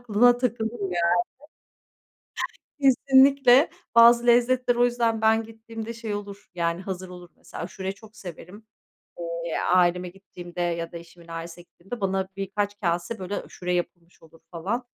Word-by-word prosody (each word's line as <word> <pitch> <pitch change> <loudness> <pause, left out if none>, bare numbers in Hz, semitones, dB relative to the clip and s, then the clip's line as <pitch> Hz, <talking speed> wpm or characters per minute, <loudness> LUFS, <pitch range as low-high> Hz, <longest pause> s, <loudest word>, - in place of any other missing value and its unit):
Aklına 245 +1 +4
takılır 235 -2 -2
yani. 175 -3 +1 1.7
Kesinlikle. 270 0 +5 0.2
Bazı 235 +1 +7
lezzetler 245 +1 +4
o 240 0 +3
yüzden 235 -2 +1
ben 220 0 +3
gittiğimde 225 0 -8
şey 225 -2 -5
olur, 205 0 -7
yani, 170 +1 -1
hazır 185 -1 -6
olur. 180 -1 -12
Mesela - - -9
aşureyi 190 +2 -5
çok 215 +1 -17
severim. 185 +4 -11 0.8
Eee, 165 - -2 0.2
aileme 180 0 +3
gittiğimde 175 -2 -10
ya 170 -1 -2
da - - -7
eşimin 170 0 -16
ailesine 165 +1 -7
gittiğimde 195 +7 -10
bana 190 -1 -1
birkaç 200 +1 -3
kâse, 175 +5 -1
böyle, 190 +2 -5
aşure 180 0 -5
yapılmış 175 0 -5
olur 165 0 -19
falan. 200 +9 -3
200 Hz, 140 wpm, -25 LUFS, 175-235 Hz, 1.7 s, Bazı